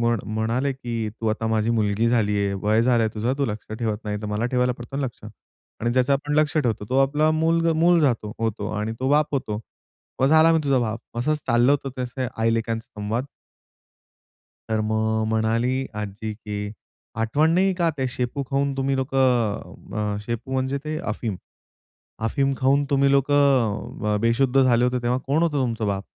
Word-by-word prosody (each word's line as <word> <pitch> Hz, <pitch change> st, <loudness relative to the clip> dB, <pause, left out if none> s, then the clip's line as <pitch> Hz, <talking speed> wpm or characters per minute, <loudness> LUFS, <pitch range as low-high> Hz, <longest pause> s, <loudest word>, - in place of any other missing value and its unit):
म्हण 115 Hz, -2 st, +1 dB
म्हणाले 120 Hz, +5 st, 0 dB
की, 120 Hz, -3 st, -6 dB, 0.2 s
"तू 110 Hz, +1 st, -6 dB
आता 110 Hz, +1 st, -1 dB
माझी 110 Hz, 0 st, +1 dB
मुलगी 110 Hz, 0 st, +1 dB
झाली 110 Hz, -3 st, +2 dB
आहे, 100 Hz, -1 st, 0 dB
वय 110 Hz, +2 st, +3 dB
झालंय 120 Hz, -2 st, +3 dB
तुझं 115 Hz, +5 st, 0 dB
तू 140 Hz, -, +2 dB
लक्ष 105 Hz, -1 st, -6 dB
ठेवत 110 Hz, -3 st, -1 dB
नाही 105 Hz, 0 st, -2 dB
तर 105 Hz, -, -3 dB
मला 105 Hz, +3 st, -1 dB
ठेवायला 125 Hz, 0 st, +2 dB
पडतो 120 Hz, +3 st, -7 dB
ना 140 Hz, -, -1 dB
लक्ष" 120 Hz, -4 st, -7 dB, 0.6 s
आणि 120 Hz, +1 st, 0 dB
ज्याचं 130 Hz, +2 st, +2 dB
आपण 145 Hz, +2 st, 0 dB
लक्ष 155 Hz, 0 st, +1 dB
ठेवतो 120 Hz, -7 st, 0 dB
तो 130 Hz, -, +2 dB
आपला 150 Hz, +3 st, +3 dB
मुलगा 165 Hz, +1 st, +2 dB
मूल 175 Hz, 0 st, +5 dB
जातो 115 Hz, -7 st, +1 dB
होतो 110 Hz, -2 st, -2 dB
आणि 110 Hz, +1 st, -2 dB
तो 130 Hz, -, 0 dB
बाप 150 Hz, 0 st, +2 dB
होतो. 110 Hz, -6 st, -2 dB, 0.6 s
"मग 135 Hz, -, +4 dB
झाला 160 Hz, +2 st, +6 dB
मी 165 Hz, -, +4 dB
तुझा 135 Hz, -2 st, +3 dB
बाप!" 115 Hz, -1 st, -2 dB, 0.2 s
असंच 150 Hz, +5 st, +1 dB
चाललं 120 Hz, +3 st, +4 dB
होतं 140 Hz, -1 st, -1 dB
त्याचे 125 Hz, 0 st, -3 dB
आई 115 Hz, 0 st, +2 dB
लेकांचा 115 Hz, 0 st, -2 dB
संवाद. 115 Hz, +6 st, -2 dB, 1.4 s
तर 110 Hz, -1 st, 0 dB
मग 110 Hz, 0 st, 0 dB
म्हणाली 115 Hz, +4 st, 0 dB
आजी 105 Hz, +1 st, -5 dB
की, 105 Hz, -1 st, -5 dB, 0.4 s
"आठवण 130 Hz, +8 st, +2 dB
नाहीये 190 Hz, +1 st, +3 dB
का 170 Hz, -2 st, +1 dB
ते 130 Hz, -, 0 dB
शेपू 125 Hz, +3 st, -3 dB
खाऊन 140 Hz, 0 st, +1 dB
तुम्ही 135 Hz, 0 st, 0 dB
लोकं" 120 Hz, -5 st, -1 dB
अ, -, -, -3 dB
शेपू 120 Hz, +3 st, -4 dB
म्हणजे 130 Hz, +1 st, 0 dB
ते 155 Hz, 0 st, -3 dB, 0.2 s
अफीम. 110 Hz, -4 st, -4 dB, 0.9 s
"अफीम 135 Hz, +3 st, +1 dB
खाऊन 140 Hz, +2 st, +3 dB
तुम्ही 140 Hz, 0 st, +3 dB
लोकं 135 Hz, -7 st, +2 dB
अ, -, -, +2 dB
बेशुद्ध 125 Hz, +3 st, +3 dB
झाले 120 Hz, -1 st, +4 dB
होते 125 Hz, 0 st, +1 dB
तेव्हा 120 Hz, +1 st, +1 dB
कोण 150 Hz, +4 st, +2 dB
होतं 160 Hz, -4 st, +1 dB
तुमचं 115 Hz, -4 st, -1 dB
बाप?" 100 Hz, -1 st, -2 dB
120 Hz, 185 wpm, -23 LUFS, 110-140 Hz, 1.4 s, झाला